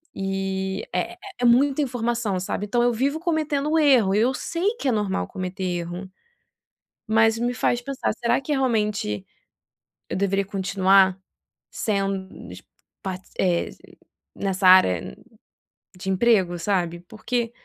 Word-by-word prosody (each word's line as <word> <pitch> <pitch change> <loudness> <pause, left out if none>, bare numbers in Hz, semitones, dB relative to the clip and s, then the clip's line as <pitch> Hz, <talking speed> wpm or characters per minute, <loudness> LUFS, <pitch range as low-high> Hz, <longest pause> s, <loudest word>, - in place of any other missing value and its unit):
E 195 0 -2
é - - -1
é - - -16 0.3
é - - +4
muita 270 +4 +4
informação, 240 -6 -1
sabe. 190 +2 -3
Então 240 +3 +1
eu 245 - +3
vivo 275 +6 0
cometendo 310 -2 0
erro. 250 -10 +4
Eu 235 +5 +3
sei 355 - -1
que 280 - -3
é - - +3
normal 205 - -1
cometer 185 +1 -5
erro. 175 +1 -4 1.0
Mas 225 +1 +3
me 245 +1 0
faz 245 -1 0
pensar: 270 -3 -2
"Será 235 +1 +1
que 295 +2 -2
realmente 210 - 0 0.8
eu - - -3
deveria 195 0 +1
continuar 190 -1 +3 0.5
sendo 195 -2 -3
dis - - -10 0.4
par 185 -1 -4 0.2
eh, 175 -2 +1 0.7
nessa 190 -1 0
área 95 - +5 0.8
de 190 +1 -5
emprego", 190 -4 +2
sabe, 175 -2 -1
porque 230 +4 -3
205 Hz, 135 wpm, -24 LUFS, 190-245 Hz, 1.0 s, área